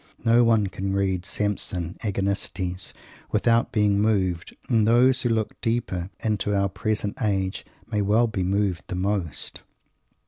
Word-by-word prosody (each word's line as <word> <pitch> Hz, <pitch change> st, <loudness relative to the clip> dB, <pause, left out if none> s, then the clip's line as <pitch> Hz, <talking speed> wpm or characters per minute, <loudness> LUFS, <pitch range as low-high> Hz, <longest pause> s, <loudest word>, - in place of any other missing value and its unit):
No 115 Hz, +1 st, +5 dB
one 115 Hz, -3 st, +4 dB
can 95 Hz, 0 st, -3 dB
read 95 Hz, -2 st, 0 dB
Samson 95 Hz, -4 st, -1 dB
Agonistes 95 Hz, -2 st, -2 dB, 0.4 s
without 115 Hz, 0 st, +2 dB
being 105 Hz, -2 st, +2 dB
moved, 95 Hz, -5 st, 0 dB
and 110 Hz, -4 st, +3 dB
those 125 Hz, +3 st, +4 dB
who 120 Hz, -, +1 dB
look 110 Hz, -2 st, -1 dB
deepest 95 Hz, -6 st, -1 dB
into 105 Hz, -2 st, 0 dB
our 100 Hz, 0 st, +2 dB
present 105 Hz, +1 st, -2 dB
age 95 Hz, -3 st, 0 dB, 0.3 s
may 105 Hz, -2 st, +1 dB
well 105 Hz, +4 st, +3 dB
be 110 Hz, -4 st, -3 dB
moved 95 Hz, -1 st, 0 dB
the -, -, -4 dB
most! 95 Hz, -3 st, -2 dB
100 Hz, 140 wpm, -25 LUFS, 95-110 Hz, 0.4 s, No